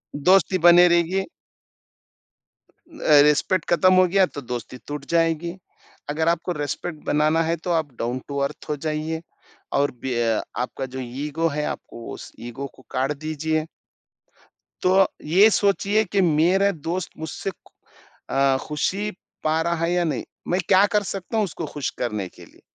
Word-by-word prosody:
दोस्ती 185 +4 +4
बनी 175 +1 +7
रहेगी। 175 +3 +2 1.6
अ, 155 - +4
रिस्पेक्ट 150 +4 +2
खत्म 185 +2 +5
हो 185 0 +5
गया 190 +1 +4
तो 145 - -8
दोस्ती 125 +1 -6
टूट 145 -1 -5
जाएगी। 165 +2 +1 0.5
अगर 160 +2 0
आपको 170 +1 -1
रिस्पेक्ट 150 +2 -4
बनाना 155 +2 +2
है 165 +1 0
तो 175 - 0
आप 145 -4 -5
डाउन 120 +2 -2
टू 140 -1 -4
अर्थ 150 - -14
हो 150 - 0
जाइए 155 +1 -2 0.6
और 145 0 +2
बी 125 +1 -5
अ, 115 -1 +1 0.2
आपका 130 +2 -3
जो - - -3 0.3
ईगो 165 +3 0
है 150 - 0
आपको 115 - -12
उस - - -10 0.2
ईगो 140 +4 -6
को - - -17
काट 135 +2 0
दीजिए। 155 +1 -1 1.1
तो 190 +1 +4 0.2
ये 190 +8 +6
सोचिए 205 +1 +2
कि 200 -1 +3
मेरा 180 +5 +3 0.2
दोस्त 180 +1 -2
मुझसे 160 +4 -4
खु - - -26 0.6
अ, 135 -1 +3
खुशी 195 +8 -1 0.3
पा 155 +1 +2
रहा 170 +1 0
है 170 - -1
या 175 -1 +2
नहीं? 145 -8 -2 0.2
मैं 180 +2 +1
क्या 195 +1 +6
कर 205 - +3
सकता 195 +3 -4
हूँ 215 - +3
उसको 165 -2 -6
खुश 140 -4 -1
करने 105 -6 -2
के - - -15
लिए? - - -22
160 Hz, 165 wpm, -23 LUFS, 145-185 Hz, 1.6 s, बनी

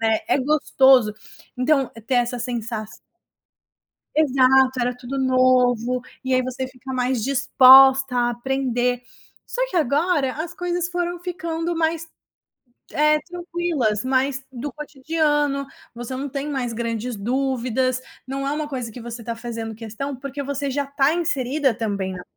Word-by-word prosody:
né, 220 +2 +2
é 345 - +2
gostoso! 265 -5 +4 0.5
Então 270 0 +2 0.2
ter 265 - 0
essa 245 0 +1
sensa 230 -2 -4 1.3
Exato, 265 -3 +4
era 245 +1 0
tudo 255 +2 -5
novo, 255 -2 +2 0.2
e 260 0 +1
aí 255 - +3
você 255 +1 -4
fica 260 +1 -9
mais 250 -2 0
disposta 265 0 +6
a 240 0 +2
aprender, 245 0 -1 0.4
só - - -5
que 370 - -4
agora 290 -1 +1
as 345 0 -7
coisas 355 0 -2
foram 350 0 -2
ficando 340 -2 -3
mais, 325 0 0 0.9
eh, 300 +1 +3
tranquilas, 340 - -2
mais 265 +1 0
do 260 +3 -5
cotidiano, 295 -1 -1 0.3
você 240 +2 -6
não 280 +2 -4
tem 280 +2 -4
mais 260 -4 -2
grandes 230 0 -3
dúvidas, 255 +2 -1 0.3
não 275 +1 -4
é 280 - 0
uma 300 0 -3
coisa 250 -5 -5
que 245 - -9
você 235 0 -8
tá 230 - -3
fazendo 230 -1 -6
questão, 230 +6 -6
porque 275 +2 -6
você 280 0 -3
já 280 +1 -1
tá 280 +1 +2
inserida 285 -6 0
também 200 -5 -2
na 180 - -7
265 Hz, 145 wpm, -22 LUFS, 245-290 Hz, 1.3 s, disposta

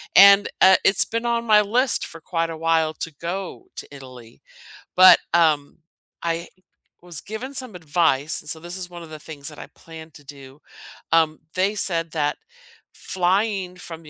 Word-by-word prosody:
And, 200 +1 +8
uh, 190 0 +7
it's 195 - +3
been 230 +1 -4
on 235 0 -1
my 210 -1 +5
list 240 +5 0
for 165 - -11
quite 165 0 -2
a 160 - -6
while 160 -1 +1
to 165 - -6
go 190 - -5
to - - -7
Italy. 125 -4 -14 0.5
But, 185 0 +8
um, 155 -3 +2 0.4
I 165 0 -2 0.5
was 175 -4 -8
given 235 +6 -7
some 255 -5 -4
advice, 160 -3 0
and 150 - -9
so 160 - -5
this 175 +3 -8
is 180 -1 -5
one 175 -1 -10
of 160 - -12
the 155 - -9
things 145 -2 -10
that 150 - -9
I - - -8
plan 160 -1 -13
to 145 -1 -16
do, 140 0 -13 0.5
um, 160 -1 +2 0.2
they 195 +3 +1
said 165 -5 -2
that 150 -2 -1 0.6
flying 190 0 -1
from 165 -2 -10
the 150 - -14
170 Hz, 180 wpm, -22 LUFS, 155-195 Hz, 0.6 s, And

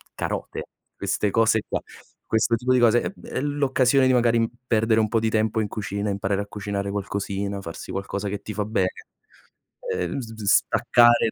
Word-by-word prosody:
carote, - - -4 0.3
queste 105 - 0
cose 110 -1 +3
qua, - - -1 0.5
questo 110 +1 +2
tipo 125 +3 +1
di 130 - +4
cose 120 0 +5
è - - -2
b - - -15
è - - -3
l'occasione 135 -2 +2
di 130 - +4
magari 115 -2 +3 0.2
perdere 110 0 +3
un 110 - +2
po' 115 - +2
di 110 0 0
tempo 110 0 +1
in 105 - -1
cucina, 100 0 -3
imparare 100 0 -1
a 100 - -6
cucinare 100 -1 -4
qualcosina, 100 0 -3
farsi 85 -2 -8
qualcosa 100 +1 -3
che 100 0 -4
ti 110 - -6
fa 105 -1 -1
bene. 95 -4 0 1.0
Ehm, 450 - -2
z 115 -3 -7
vis 105 -3 -3
staccare 120 -2 +4
110 Hz, 185 wpm, -24 LUFS, 100-120 Hz, 1.0 s, cose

